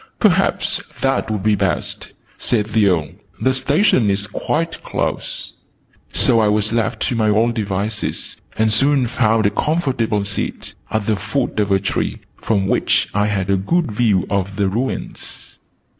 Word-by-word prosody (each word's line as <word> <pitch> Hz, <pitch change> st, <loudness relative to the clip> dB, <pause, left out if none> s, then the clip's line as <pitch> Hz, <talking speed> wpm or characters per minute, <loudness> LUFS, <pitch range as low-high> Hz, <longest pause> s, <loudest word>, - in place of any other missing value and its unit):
"Perhaps 195 Hz, -3 st, +2 dB, 0.2 s
that 135 Hz, -4 st, +1 dB
would 105 Hz, -3 st, -2 dB
be 105 Hz, 0 st, +3 dB
best," 95 Hz, -2 st, -2 dB, 0.2 s
said 110 Hz, -4 st, 0 dB
the 110 Hz, -1 st, +2 dB
Earl. 85 Hz, -5 st, +1 dB, 0.3 s
"The 130 Hz, -, +2 dB
Station 130 Hz, -, +3 dB
is 100 Hz, +1 st, 0 dB
quite 165 Hz, +9 st, -2 dB
close." -, -, -3 dB, 0.6 s
So 115 Hz, -2 st, +3 dB
I 110 Hz, -, +3 dB
was 105 Hz, +1 st, +1 dB
left 115 Hz, -1 st, 0 dB
to 125 Hz, -, 0 dB
my 110 Hz, -2 st, +2 dB
own 115 Hz, +3 st, +3 dB
devices, 105 Hz, -1 st, -3 dB, 0.2 s
and 110 Hz, 0 st, +3 dB
soon 135 Hz, +3 st, +4 dB
found 110 Hz, -2 st, +2 dB
a 100 Hz, -, +3 dB
comfortable 120 Hz, -7 st, 0 dB
seat, 100 Hz, -, -4 dB, 0.2 s
at 110 Hz, -2 st, -1 dB
the 110 Hz, -1 st, +1 dB
foot 110 Hz, +4 st, -2 dB
of 105 Hz, -1 st, +1 dB
a 95 Hz, -, +5 dB
tree, 95 Hz, -, -2 dB, 0.2 s
from 100 Hz, -3 st, +1 dB
which -, -, +1 dB
I 105 Hz, +1 st, +2 dB
had 100 Hz, -2 st, -1 dB
a 100 Hz, -, +3 dB
good 160 Hz, -, 0 dB
view 105 Hz, -4 st, +2 dB
of 100 Hz, 0 st, -1 dB
the 100 Hz, 0 st, +1 dB
ruins. 120 Hz, +7 st, -5 dB
110 Hz, 160 wpm, -19 LUFS, 100-125 Hz, 0.6 s, a